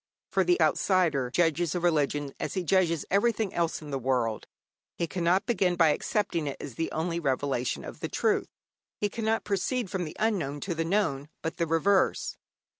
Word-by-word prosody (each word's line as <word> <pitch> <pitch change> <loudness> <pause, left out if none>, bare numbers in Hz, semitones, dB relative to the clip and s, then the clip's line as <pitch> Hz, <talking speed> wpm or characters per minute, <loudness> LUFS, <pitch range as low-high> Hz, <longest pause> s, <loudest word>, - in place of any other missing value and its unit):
For - - +3
the 355 0 +2
outsider 160 -10 +2
judges 165 +2 +1
a - - +1
religion 145 -4 +1
as - - -3
he 185 - 0
judges 170 -3 +2
everything 210 0 +2
else 165 -2 -1
in 150 - -8
this 135 -1 -2
world. 120 -4 0 0.5
He 170 - 0
cannot 175 +3 +1
begin 190 -7 +1
by 165 -2 +5
accepting 165 0 0
it 140 - -4
as 140 - -7
the 165 +8 -3
only 165 +2 -1
revelation 135 -4 -1
of - - -9
truth; - - +1 0.5
he 205 - +1
cannot 225 0 -1
proceed 210 +2 -1
from 190 -3 -1
the 155 - -8
unknown 185 -10 0
to 185 - -2
the 165 0 -2
known, 155 -7 0
but 160 - -3
the 170 -2 0
reverse. 175 +5 +2
170 Hz, 180 wpm, -28 LUFS, 145-195 Hz, 0.5 s, by